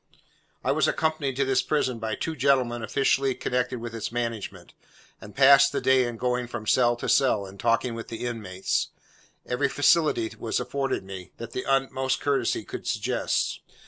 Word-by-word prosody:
I - - +1
was - - +2
accompanied 155 -4 -1
to 140 +1 +1
this 135 -1 +2
prison 130 -6 -1
by 110 -1 -2
two 160 +7 -4
gentlemen 125 -3 +2
officially 135 +2 +1
connected 125 0 -1
with 115 -1 -7
its 115 -1 -4
management, 115 -3 -4 0.5
and 105 - -12
passed 140 +1 +7
the - - -1
day 130 -1 +3
in 120 -1 -5
going 125 0 -1
from 120 -2 -6
cell 120 +2 +3
to 120 - -6
cell, 115 -7 +3
and 95 +1 -12
talking 115 +1 +1
with 115 0 -7
the 115 +1 -6
inmates. 100 -6 -2 0.6
Every 125 - 0
facility 145 -6 +2
was 115 - -1
afforded 135 -6 -2
me, 95 -1 -9
that 115 0 -8
the 125 - -5
utmost 135 -1 0
courtesy 135 -6 0
could - - -7
suggest. - - -1
125 Hz, 175 wpm, -26 LUFS, 115-135 Hz, 0.6 s, passed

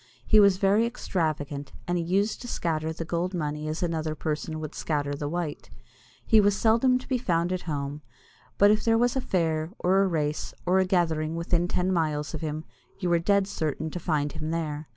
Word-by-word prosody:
He 215 - +6
was 200 -2 +6
very 205 +4 +3
extravagant, 155 - -3
and 175 - 0
he 175 - 0
used 195 +5 0
to 245 - -7
scatter 160 -7 -1
the 165 +1 -5
gold 175 +3 -2
money 150 -2 -3
as 155 +3 -3
another 160 -2 -1
person 155 +1 -3
would 155 -1 -6
scatter 145 -2 -2
the 145 0 -3
white. 170 -2 -4 0.6
He 220 -2 +6
was 205 0 +3
seldom 235 +3 +4
to 255 - -10
be 255 -3 0
found 175 -5 0
at 185 - -2
home, 145 0 -3 0.6
but 205 +1 +6
if 215 - +2
there 225 -1 +3
was 240 +2 +2
a 265 - 0
fair, 160 -6 0
or 190 +2 +3
a 195 - +3
race, 150 -4 -2
or 185 +2 +3
a 190 - +3
gathering 165 -4 +1
within 170 +1 0
ten 185 +1 0
miles 155 -3 -1
of 155 - -4
him, 155 0 -3 0.3
you 180 -3 -1
were 170 - +4
dead 200 +3 +2
certain 155 -3 -3
to 175 - -4
find 150 -4 0
him 155 0 -5
there. 155 -2 -3
165 Hz, 210 wpm, -27 LUFS, 155-190 Hz, 0.6 s, He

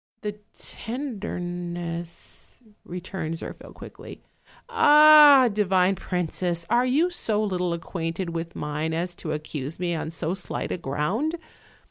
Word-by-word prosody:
"The 210 0 -5 0.2
tenderness," 175 - -6 0.2
returned 180 -2 -5
Zirphil - - -9
quickly; - - -11 0.4
"ah, 300 - +8
di 210 - +1
vine 190 -1 +3
princess, 175 -2 -2
are 245 +2 +3
you 310 +8 +2
so 215 -10 -1
little 180 -4 -1
acquainted 170 +1 -4
with 165 0 -5
mine 150 +2 -3
as 175 +2 -2
to 155 - -5
accuse 150 -1 -5
me 175 -1 -1
on 160 -1 -3
so 165 +1 -2
slight 190 - -4
a - - -1
ground? 175 - -1
180 Hz, 125 wpm, -25 LUFS, 165-215 Hz, 0.4 s, ah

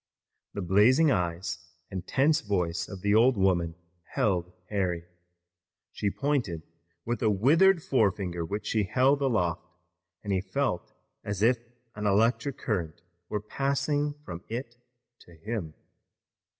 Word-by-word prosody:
The 100 - -3
blazing 120 - +5
eyes 85 -3 -1 0.3
and 95 -1 -5
tense 150 +4 +3
voice 85 -6 -1
of 95 -3 -8
the 100 +1 +2
old 120 +2 +5
woman 90 -4 +2 0.4
held 90 -3 +1 0.2
Harry. 90 -4 -1 0.9
She 105 - -1
pointed 115 - -1 0.4
with 120 -1 -2
a 110 - +3
withered 160 - +4
forefinger 95 -8 +1
which 100 +6 -4
she 110 -3 +1
held 130 +7 +3
aloft 95 -10 +1 0.6
and 100 -2 -1
he 95 - +1
felt 135 -3 -2 0.3
as 100 0 -2
if 120 +1 +4 0.3
an 105 0 -2
electric 115 +6 +2
current 85 -7 -3 0.3
were 105 - -2
passing 145 +5 -1
from 85 +1 -7
it 120 +1 -5 0.4
to 85 - -17
him. 85 -2 -5
105 Hz, 130 wpm, -28 LUFS, 90-130 Hz, 0.9 s, blazing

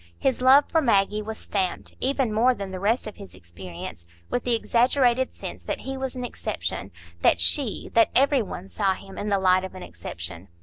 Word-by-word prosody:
His 260 -2 0
love 270 +3 +7
for 325 - +2
Maggie 210 -4 +2
was 220 +1 -6
stamped, 190 -3 -3
even 265 -4 0
more 245 +4 +3
than 200 -3 -6
the 185 - -5
rest 220 +6 +1
of 215 - -8
his 95 -2 -11
experience, 85 -1 -9 0.2
with 245 - -1
the 245 -1 +3
exaggerated 245 +2 +2
sense - - -8
that - - -3
he 270 0 -5
was 265 -1 -4
an 250 -1 -4
exception,—that 85 - -2
she, 230 - +2
that 230 - +5
every 275 0 +4
one, 190 -2 -7
saw 195 -1 0
him 195 0 -12
in 210 - -3
the 200 - +2
light 185 -1 +3
of 190 - -7
an - - -8
exception. 85 +1 -7
210 Hz, 200 wpm, -25 LUFS, -, 0.2 s, love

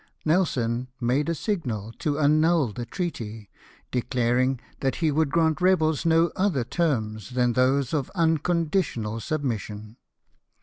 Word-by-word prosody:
Nelson 130 -8 +1
made 130 +6 +1
a 170 - 0
signal 125 - -3
to 145 -2 -1
annul 155 -3 +3
the 120 +1 -6
treaty, 115 - -5 0.4
declaring 125 +1 +1 0.2
that 135 -2 0
he 160 -3 +1
would 155 0 +1
grant 160 +2 +1
rebels 165 -4 +2
no 165 0 +4
other 185 -10 +1
terms 110 - -1
than 125 -1 +1
those 130 +2 +2
of 145 -4 -1
unconditional 160 - 0
submission. 110 -6 -4
140 Hz, 125 wpm, -25 LUFS, 120-160 Hz, 0.4 s, no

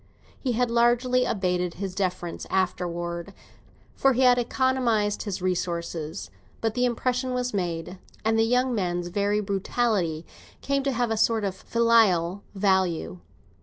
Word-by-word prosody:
He 255 -3 -1
had 240 +1 +1
largely 240 +2 +3
abated 180 -4 -1
his 190 0 -4
deference 180 -3 -3
afterwards, 175 -1 -2 0.6
for 270 -1 +3
he 255 +2 +3
economised 245 -3 +2
his 195 -3 -4
resources, 170 -2 -3 0.3
but 225 -1 -1
the 250 +1 +1
impression 250 +1 -1
was 250 -1 -2
made, 175 -1 -3 0.3
and 220 0 +3
the 225 - +3
young 250 +2 +2
man's 175 -4 -1
very 205 +2 0
brutality 195 -4 -1 0.3
came 275 0 0
to 275 0 0
have 245 -2 0
a 225 - 0
sort 225 0 +2
of 195 -2 -1
filial 200 -4 +2
value. 190 - +1
205 Hz, 135 wpm, -26 LUFS, 180-245 Hz, 0.6 s, largely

